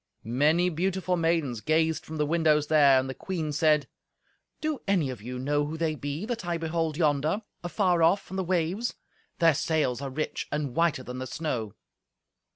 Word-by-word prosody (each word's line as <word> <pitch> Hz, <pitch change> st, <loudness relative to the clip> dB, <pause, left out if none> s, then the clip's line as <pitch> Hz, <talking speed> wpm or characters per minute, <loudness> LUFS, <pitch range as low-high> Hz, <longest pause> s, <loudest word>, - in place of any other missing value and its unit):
Many 150 Hz, +9 st, +2 dB
beautiful 185 Hz, +2 st, 0 dB
maidens 165 Hz, -9 st, 0 dB
gazed 160 Hz, +2 st, +1 dB
from 160 Hz, -, -6 dB
the 150 Hz, -, +1 dB
windows 155 Hz, -1 st, +2 dB
there, 140 Hz, -4 st, +6 dB
and 130 Hz, -, -2 dB
the 130 Hz, -, -4 dB
queen 160 Hz, +2 st, -4 dB
said, 150 Hz, -1 st, +3 dB, 0.7 s
"Do 310 Hz, -3 st, -2 dB
any 175 Hz, -9 st, +2 dB
of 120 Hz, -5 st, -8 dB
you 125 Hz, +3 st, -6 dB
know 145 Hz, +3 st, 0 dB
who 160 Hz, +2 st, -5 dB
they 160 Hz, -1 st, 0 dB
be, 145 Hz, +5 st, -4 dB
that 235 Hz, -4 st, -3 dB
I 175 Hz, -1 st, -1 dB
behold 165 Hz, -1 st, -2 dB
yonder, 155 Hz, +5 st, +1 dB, 0.2 s
afar 175 Hz, -1 st, +1 dB
off 175 Hz, +5 st, +2 dB
on -, -, -4 dB
the 190 Hz, -, 0 dB
waves? 185 Hz, +5 st, -1 dB, 0.4 s
Their 165 Hz, -1 st, +5 dB
sails 145 Hz, -4 st, 0 dB
are 140 Hz, -, -3 dB
rich 155 Hz, +4 st, -3 dB
and 145 Hz, -3 st, -2 dB
whiter 160 Hz, -5 st, +2 dB
than 125 Hz, 0 st, -6 dB
the 130 Hz, -, -4 dB
snow." 120 Hz, -8 st, -3 dB
155 Hz, 180 wpm, -27 LUFS, 145-170 Hz, 0.7 s, there